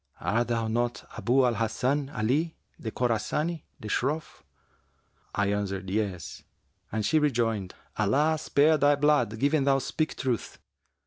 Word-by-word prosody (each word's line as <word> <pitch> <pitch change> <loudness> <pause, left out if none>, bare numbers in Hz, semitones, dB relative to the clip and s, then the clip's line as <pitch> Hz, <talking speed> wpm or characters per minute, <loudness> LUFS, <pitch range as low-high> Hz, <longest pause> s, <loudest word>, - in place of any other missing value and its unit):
Art 115 +8 0
thou 115 -2 0
not 120 +2 -1
Abu 125 +5 +3
al 120 - +2
Hasan 125 +6 0
Ali 145 +8 0 0.2
the 110 - -4
Khorasani, 125 +8 -1 0.2
the 110 - -7
Shroff?' 140 +8 -2 0.9
I 100 0 +1
answered, 100 -2 -3
'Yes,' 95 -5 -3 0.5
and 110 -1 -1
she 155 - +3
rejoined, 115 - 0 0.2
'Allah 145 +10 +2
spare 155 +1 +3
thy 145 +1 +5
blood 140 -6 +2
given 140 +4 +2
thou 135 0 +4
speak 155 +3 -2
truth! 125 -4 -2
120 Hz, 135 wpm, -28 LUFS, 110-145 Hz, 0.9 s, thy